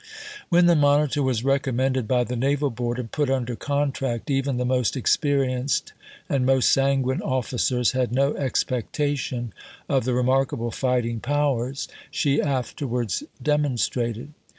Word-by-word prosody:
When 175 0 +5
the 175 -1 +5
Monitor 145 0 +3
was 130 -4 0
recommended 130 -2 0
by 125 +1 +2
the 125 +1 -4
Naval 140 +3 +1
Board, 120 +1 -3
and 120 -3 -5
put 145 -3 0
under 125 -3 -1
contract, 140 -3 -2
even 135 -1 0
the 125 - -1
most 125 0 +1
experienced 135 0 0 0.3
and 135 -2 0
most 130 0 +3
sanguine 135 -1 +2
officers 125 -1 0
had 130 -2 -1
no 140 +3 +2
expectation 130 -1 -2 0.3
of 135 -2 +1
the 125 -1 0
remarkable 125 -2 +1
fighting 120 -3 0
powers 135 -1 -1 0.2
she 140 0 +1
afterwards 125 - -2 0.2
demonstrated. 130 -3 -1
130 Hz, 130 wpm, -24 LUFS, 125-140 Hz, 0.3 s, When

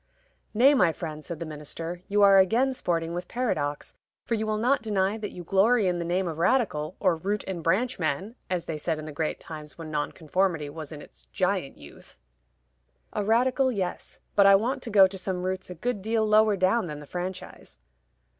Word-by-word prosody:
"Nay, 265 +6 +6
my 215 - +4
friend," 155 -1 -7
said 170 -1 -6
the 170 - -4
minister, 165 +3 -7
"you 205 0 +3
are 195 -1 +7
again 235 +8 +3
sporting 165 -7 -2
with 175 +1 -4
paradox; 150 - -2 0.3
for - - -2
you 220 -1 -1
will 215 0 0
not 250 +6 +2
deny 200 -2 0
that 215 -2 -5
you 175 - -9
glory 200 +5 +3
in 175 -1 0
the - - -2
name 180 +2 0
of 165 -1 -5
Radical, 180 - +1
or 185 -4 +3
Root 200 +6 -2
and 185 -3 -4
branch 215 +9 0
man, 170 +7 -2 0.2
as 180 -2 -2
they 155 -2 -4
said 160 +1 -1
in 155 - -7
the 155 - -7
great 155 +2 -2
times 155 -2 -10
when 160 -2 -8
Nonconformity 155 +1 -1
was 155 -1 -8
in 150 -2 -8
its - - -16
giant - - -1
youth." - - -15 1.0
"A 210 - -1
Radical 255 +5 +2
yes; 190 -6 -4 0.2
but 200 -1 +6
I 195 - +8
want 250 +7 0
to 235 - -6
go 200 -3 +7
to 190 0 -4
some 185 -1 -3
roots 185 0 -3
a 180 - -7
good 225 +4 -3
deal 220 +2 +1
lower 215 -1 +4
down 185 +3 +2
than 150 -2 -6
the 150 - -10
franchise." 180 +3 -7
185 Hz, 205 wpm, -27 LUFS, 165-215 Hz, 1.0 s, I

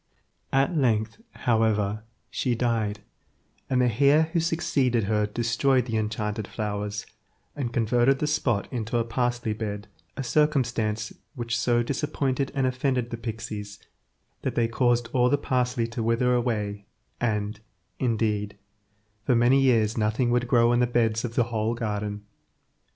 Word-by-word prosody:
At 135 +5 +2
length, 115 - +1 0.2
however, 110 -3 +2 0.3
she 125 -3 0
died, 110 -4 -1 0.7
and 130 - +2
the 120 +1 0
heir 145 +3 +6
who 170 - +3
succeeded 145 -8 +1
her 105 +1 +1
destroyed 120 +4 +1
the 115 -3 -3
enchanted 105 -1 -2
flowers, 105 -1 -3 0.5
and 130 -5 -3
converted 120 +3 +2
the 150 - -1
spot 125 -8 0
into 120 0 -1
a 115 - +2
parsley–bed, 115 -3 -2 0.3
a 135 - -2
circumstance 120 -6 +1 0.2
which 120 -2 -2
so 120 +1 +2
disappointed 140 0 -1
and 135 -1 +1
offended 130 -1 0
the 115 - -3
pixies, 110 -3 -6 0.6
that - - -2
they 115 -1 +2
caused 120 0 +1
all 125 -1 +4
the 145 - +3
parsley 125 -3 0
to 120 0 -4
wither 115 +2 +2
away, 105 -5 -1 0.3
and, 105 -2 -1 0.4
indeed, 105 -4 0 0.7
for 125 - +2
many 120 +3 +4
years 115 -4 +3
nothing 110 +3 +1
would 120 0 +1
grow 120 -1 +4
in 120 - +3
the 125 - +3
beds 115 -2 +1
of 120 -2 -4
the 120 - +4
whole 110 +1 0
garden. 105 -2 -3
120 Hz, 145 wpm, -26 LUFS, 110-125 Hz, 0.7 s, heir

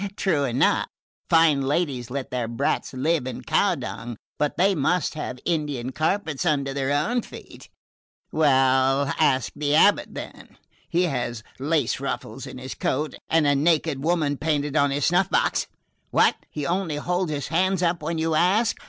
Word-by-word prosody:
True 155 -7 +1
enough 125 -1 +2 0.4
fine 160 -4 +4
ladies 135 -4 -1
let 140 +1 -5
their 125 -2 -2
brats 115 0 -1
live 140 +1 0
in 130 - -6
cow - - +2
dung, 115 0 -6 0.2
but 150 0 0
they 195 +3 +4
must 180 +2 0
have 140 -4 -5
Indian 145 -7 -2
carpets 160 0 -1
under 140 -5 0
their 135 0 -1
own 215 +13 +1
feet. - - -12 0.6
Well, 135 -1 +3
ask 135 -5 +2
the 145 0 0
abate, 205 +6 +4
then - - -9 0.3
he 175 +1 +2
has 120 -8 -2 0.2
lace 145 -2 0
ruffles - - -5
to - - -9
his 130 -1 -6
coat 135 +7 -2 0.2
and 160 -2 +3
a 145 - +4
naked 150 -1 +1
woman 155 -4 +1
painted 150 -1 -1
on 145 -2 +3
his 140 0 0
snuff 180 +2 +2
box - - +1 0.4
What? - - +3
He 150 -2 -5
only 175 -2 -1
holds 175 +3 -1
his 145 -1 -3
hands 185 +3 +1
up 170 -1 +1
when 165 +2 -3
you 160 0 0
ask? 190 +8 +2
150 Hz, 165 wpm, -24 LUFS, 135-165 Hz, 0.6 s, fine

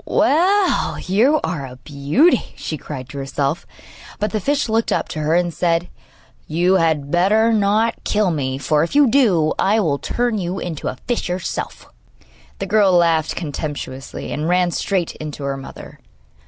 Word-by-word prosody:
'Well, 375 +6 +2
you 240 +11 +2
are 155 -6 -2
a 125 - -10
beauty!' 150 - +1
she 155 - -5
cried 135 -4 -7
to 140 - -7
herself; 140 +3 -2 0.5
but 210 -1 -2
the 215 - -1
fish 285 +7 0
looked 225 +1 0
up - - 0
to 155 - -5
her 155 +2 +1
and 175 -1 +1
said: 170 0 0 0.6
'You 175 +4 +2
had 155 -4 0
better 215 +6 +3
not 215 +2 +1
kill 210 -3 +1
me, 135 -4 -2
for, 150 +3 +1
if 170 - -2
you 290 -1 +6
do, 205 - +3
I 210 +3 +3
will 145 -8 0
turn 240 -3 -1
you 180 +1 -3
into 165 -6 -5
a - - -4
fish 240 -6 -1
yourself!' 180 0 -4 0.7
The - - -3
girl 210 -2 +3
laughed 165 -3 +2
contemptuously, 145 -4 -5
and 150 +3 -2
ran 180 0 +2
straight 185 -1 -1
in 155 - -6
to 140 - -8
her 140 0 -2
mother. 135 0 -10
175 Hz, 170 wpm, -20 LUFS, 150-215 Hz, 0.7 s, you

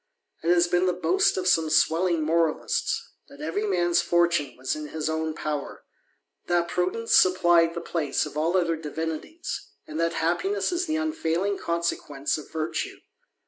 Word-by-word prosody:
It 165 - -1
has 175 0 +4
been 175 +1 +2
the 180 - +2
boast 370 - +2
some 165 -3 +3
swelling 165 +1 +2
moralists, 165 0 0 0.2
that 140 - -15
every 165 +8 -2
man's 175 -3 +2
fortune 170 -5 +1
was 130 +1 -2
in 150 -1 -6
h 155 -1 -3
own 160 0 -2
power, 150 -3 -4 0.6
that 175 -1 +2
prudence 185 +7 0
supplied 175 -2 +4
the 170 - -3
place 155 -5 -1
of 150 - -9
all 165 +4 +1
oth 180 - +2
THE 170 - -1
ADVENTURER. 155 -2 -6
259 160 -1 -3
<Kvimties, - - -1 0.3
and 155 +1 -6
that 165 0 +1
happiness 190 - 0
is 355 +1 -1
the 310 - 0
unfailing 200 - -1
consequence 160 -4 -2
of 150 - -11
virtue. 160 0 -3
170 Hz, 170 wpm, -26 LUFS, 160-180 Hz, 0.6 s, has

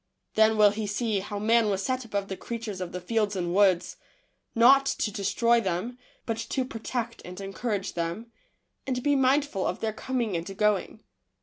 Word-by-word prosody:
Then 220 0 +4
will 210 -1 +6
he 210 0 -3
see 210 0 0
how 205 +1 -5
man 225 +1 +3
was 195 -1 -1
set 255 +1 -1
above 200 -3 -3
the 190 - -4
creatures 220 -3 -6
of 180 -1 -4
the 180 - -4
fields 210 +2 0
and 175 -2 -2
woods, 190 -3 +3 0.6
not 270 +4 +6
to 210 - -1
destroy 230 +4 +2
them, 195 +6 -3 0.3
but 225 -2 -2
to 260 +3 -2
protect 230 0 -4
and 180 +1 -9
en 195 0 -6
courage 205 -3 -2
them, 170 +8 -4 0.6
and 250 -2 -2
be 290 -1 +3
mindful 270 -5 +2
of - - -3
their 220 -1 -2
coming 235 -3 -2
and 180 +3 -5
going. 210 +1 0
215 Hz, 185 wpm, -27 LUFS, 195-235 Hz, 0.6 s, will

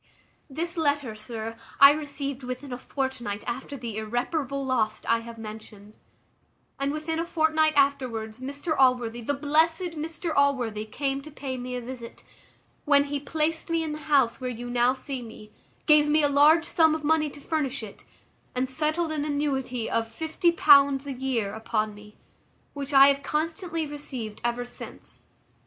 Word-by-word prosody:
"This 335 +5 -4
letter, 285 -6 0
sir, 220 +1 -6 0.2
I 275 0 +10
received 280 -2 -4
within 255 +1 -6
a - - -4
fortnight 255 -7 -4
after 260 +4 -5
the 235 -4 -6
irreparable 265 +5 -2
loss 220 -5 0
I 230 0 +3
have 230 0 -10
mentioned; 215 -1 -10 0.8
and 275 0 0
within 315 +2 -3
a - - +1
fortnight 315 -2 +2
afterwards, 255 -5 0
Mr 285 +5 -3
Allworthy 245 -3 +2
the 285 +5 -1
blessed 320 +5 +2
Mr 325 +1 -3
Allworthy, 245 -7 +1
came 275 +4 -2
to 305 - -11
pay 275 -3 -5
me 250 0 -5
a 250 - -3
visit, 240 -1 -9 0.6
when 285 -1 +5
he 285 0 -3
placed 315 +3 -1
me 330 -1 +1
in 315 - -3
the 300 - -5
house 270 -4 +3
where 255 - -2
you 245 0 -6
now 245 +1 +3
see 265 0 -5
me, 220 -2 -11 0.3
gave 300 -1 +5
me 305 0 +4
a - - +5
large 300 +4 +5
sum 320 -2 +3
of 315 - -5
money 310 0 +2
to 290 - -12
furnish 280 -5 -2
it, 205 - -10 0.5
and 255 +1 0
settled 310 +4 0
an 305 -2 -1
annuity 275 -5 -1
of 225 0 0
£50 290 -1 +4
a 280 - -4
year 245 -6 -2
upon 220 -1 -2
me, 210 0 -15 0.6
which 280 -1 -5
I 275 0 +8
have 280 0 +1
constantly 325 +2 -2
received 265 -7 -6
ever 240 +1 -1
since. 245 - -9
275 Hz, 165 wpm, -26 LUFS, 240-300 Hz, 0.8 s, I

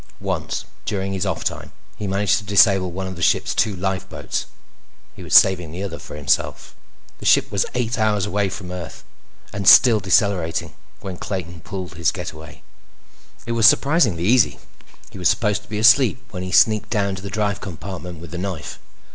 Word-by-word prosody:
Once, - - -3 0.2
during 95 -1 -3
his 95 +1 -2
off 95 - -3
time, - - -4 0.2
he 105 - -5
managed 100 +2 +1
to - - -11
disable 100 -2 +4
one 95 +2 -5
of 95 0 -6
the 85 - -9
ship's - - +1
two 110 -3 0
lifeboats. 95 +1 -4 0.7
He - - -11
was - - -1
saving 90 -4 +5
the 90 +4 -6
other 90 -4 -6
for - - -10
himself. 75 -2 -1 0.5
The - - -10
ship - - +4
was 100 -2 0
eight 120 -1 -1
hours 105 -2 +1
out 100 -1 -1
from 95 -3 -7
Earth 90 -3 -8 0.5
and 100 -2 -4
still 120 -4 +8
decelerating 95 -3 0 0.3
when 95 -2 -7
Clayton 85 -3 -5
pulled 90 0 -7
his 85 -2 +1
getaway. 80 -1 -9 0.8
It 115 - -4
was 115 -1 +5
surprisingly 135 - +3
easy. 115 +3 +3 0.5
He - - -10
was 90 - +3
supposed 105 -1 0
to 130 - -22
be 105 - -4
asleep 125 +3 +5
when 90 -3 -6
he 90 0 -5
sneaked 110 +1 +3
down 100 -3 0
to 95 - -7
the 100 - -7
drive 105 -1 -2
compartment 90 -1 -7
with 85 -1 -11
the 85 - -5
knife. 90 -6 -5
95 Hz, 185 wpm, -21 LUFS, 90-105 Hz, 0.8 s, still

